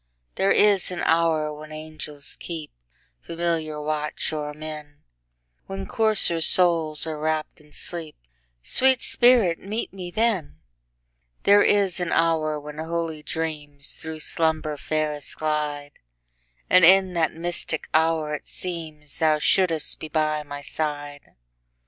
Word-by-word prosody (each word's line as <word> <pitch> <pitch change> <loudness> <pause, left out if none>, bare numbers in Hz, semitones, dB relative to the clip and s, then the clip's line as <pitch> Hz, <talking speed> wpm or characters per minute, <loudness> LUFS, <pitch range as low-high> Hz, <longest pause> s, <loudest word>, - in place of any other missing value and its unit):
There 195 - +1
is 205 -3 +4
an 180 -1 -4
hour 160 -2 +2
when 155 +1 -10
angels 155 -2 -6
keepFamiliar 155 - -5
watch 150 +1 -2
o'er 150 -1 -3
men, 150 -1 -9 0.6
When 95 0 -5
coarser 215 -7 +2
souls 165 -3 +4
are 155 -2 -4
wrapp'd 155 +1 -2
in 150 0 -21
sleep—Sweet - - -1
spirit, 235 -9 +4
meet 210 +3 -4
me 185 -2 -7
then! 195 - -1 0.8
There 205 +1 +6
is 195 -3 +2
an 175 -2 -2
hour 155 -2 +1
when 150 +1 -9
holy 165 -1 -3
dreamsThrough 155 0 -5
slumber 160 -2 0
fairest 150 0 -3
glide; 150 -2 -2 0.8
And 185 -1 +5
in 190 +1 +6
that 165 -2 0
mystic 170 -1 -3
hour 160 -1 +2
it 150 - -5
seemsThou 155 -3 -2
shouldst 165 -1 +2
be 155 - -6
by 155 -1 0
my 145 -1 -8
side. 145 -2 -5
155 Hz, 120 wpm, -24 LUFS, 150-170 Hz, 0.8 s, There